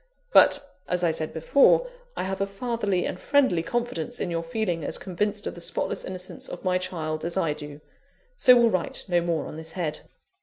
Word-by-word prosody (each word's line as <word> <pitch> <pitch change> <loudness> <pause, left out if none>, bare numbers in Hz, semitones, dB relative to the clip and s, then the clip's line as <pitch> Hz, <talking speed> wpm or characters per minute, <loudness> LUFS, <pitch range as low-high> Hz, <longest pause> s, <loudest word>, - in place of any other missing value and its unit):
But, 285 - +6 0.2
as 180 0 0
I 170 - +3
said 155 -1 -3
before, 280 - +4 0.3
I - - -1
have 190 +1 -3
a 195 - +1
fatherly 200 -3 -1
and 180 - -4
friendly 265 - +3
confidence 235 -4 -3
in 175 - -2
your 165 0 -1
feeling 170 -1 -2
as - - -1
convinced 205 +3 -2
of - - -3
the 175 - -10
spotless - - -2
innocence 185 0 -4
of 175 - -8
my 185 0 +2
child 155 -4 -3
as 170 +2 -1
I 165 -5 +1
do. 150 0 -9 0.5
So 250 - +7
will 235 -2 +5
write 185 -3 -2
no 175 -2 +2
more 170 -2 -1
on - - -8
this 160 0 -7
head. 165 -5 -2
180 Hz, 200 wpm, -26 LUFS, 165-205 Hz, 0.5 s, So